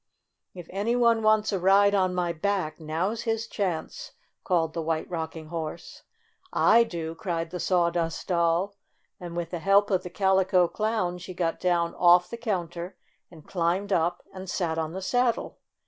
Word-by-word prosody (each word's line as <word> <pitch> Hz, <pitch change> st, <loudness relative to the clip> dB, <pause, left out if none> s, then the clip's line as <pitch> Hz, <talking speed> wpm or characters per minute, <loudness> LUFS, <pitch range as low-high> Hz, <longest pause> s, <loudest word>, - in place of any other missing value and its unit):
"If 175 Hz, -2 st, -8 dB
any 205 Hz, +5 st, 0 dB
one 235 Hz, -2 st, +3 dB
wants 215 Hz, 0 st, +3 dB
a 195 Hz, -, 0 dB
ride 200 Hz, +2 st, +5 dB
on 185 Hz, -2 st, +2 dB
my 175 Hz, -1 st, 0 dB
back, 175 Hz, -2 st, -2 dB
now's 165 Hz, +8 st, -2 dB
his 225 Hz, -1 st, -1 dB
chance 210 Hz, -, -4 dB
!" -, -, -48 dB
called 165 Hz, -4 st, +1 dB
the 165 Hz, -, -3 dB
White 160 Hz, 0 st, -2 dB
Rock 165 Hz, -2 st, -4 dB
ing 155 Hz, -1 st, -9 dB
Horse. 160 Hz, -2 st, -6 dB, 0.5 s
"I 235 Hz, -, +5 dB
do!" 165 Hz, -7 st, -5 dB
cried 165 Hz, -2 st, -3 dB
the 180 Hz, -, -5 dB
Sawdust 170 Hz, -3 st, 0 dB
Doll, 175 Hz, +2 st, +1 dB, 0.4 s
and 175 Hz, -2 st, -7 dB
with 170 Hz, -1 st, -3 dB
the 175 Hz, -, -3 dB
help 200 Hz, +4 st, +3 dB
of 185 Hz, -, +2 dB
the 180 Hz, -, -7 dB
Calico 190 Hz, -1 st, +3 dB
Clown 215 Hz, -4 st, -1 dB
she 185 Hz, +1 st, -9 dB
got 170 Hz, -2 st, -1 dB
down 175 Hz, -2 st, +1 dB
off 175 Hz, 0 st, +4 dB
the 235 Hz, -, -5 dB
counter 180 Hz, -5 st, -4 dB, 0.3 s
and 160 Hz, -4 st, -15 dB
climbed 185 Hz, +3 st, 0 dB
up 175 Hz, 0 st, 0 dB
and 185 Hz, -1 st, -8 dB
sat 165 Hz, -3 st, -1 dB
on 160 Hz, 0 st, -3 dB
the 190 Hz, +1 st, -5 dB
saddle. 245 Hz, +3 st, 0 dB
180 Hz, 180 wpm, -26 LUFS, 170-200 Hz, 0.5 s, ride